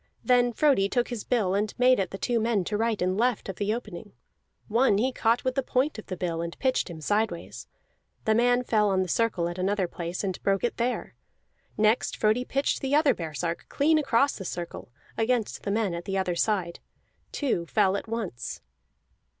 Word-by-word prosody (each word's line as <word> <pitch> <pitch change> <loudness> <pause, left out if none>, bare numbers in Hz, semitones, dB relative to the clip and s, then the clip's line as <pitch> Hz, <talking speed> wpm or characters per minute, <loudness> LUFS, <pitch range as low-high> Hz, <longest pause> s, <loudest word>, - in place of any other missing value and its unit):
Then 245 -1 +4
Frodi 235 -6 +3
took 245 +1 0
his 240 -4 -4
bill, 210 -7 +1
and 205 +1 -1
made 250 -1 +5
at 190 -2 0
the 195 - -6
two 240 +3 0
men 220 -3 +1
to 210 - -3
right 225 0 0
and 185 +1 +1
left 245 -1 +1
of 190 - -5
the 205 0 0
opening; 235 +2 -6 0.5
one 230 -2 +3
he 255 +5 +1
caught 235 -1 +1
with 255 - 0
the 270 - 0
point 260 0 0
of - - -11
the 185 - -5
bill, 170 -2 -2
and 170 0 -5
pitched 260 -6 0
him 160 -2 -8
sideways; 205 0 -2 0.6
that 220 - +3
man 245 +2 +3
fell 215 -3 +2
on 190 -1 +2
the - - -5
circle 190 -3 +1
at 175 +1 -5
another 190 0 0
place 170 +2 -5
and 190 -2 -3
broke 195 -1 +1
it 240 - -1
there. 245 +1 -2 0.6
Next 215 +2 +2
Frodi 215 +3 +2
pitched 275 +2 0
the 270 +1 +1
other 295 -3 +4
baresark 165 -1 -4
clean 310 +2 +3
across 275 -1 +2
the 195 - -6
circle 175 -5 -6 0.3
against 225 -1 0
the - - -4
men 210 -3 0
at 170 0 -5
the 195 0 -2
other 185 -2 0
side; 180 -3 0 0.5
two 235 - -1
fell 195 -1 +2
at 200 - -4
once. 220 - -5
215 Hz, 200 wpm, -27 LUFS, 185-245 Hz, 0.6 s, made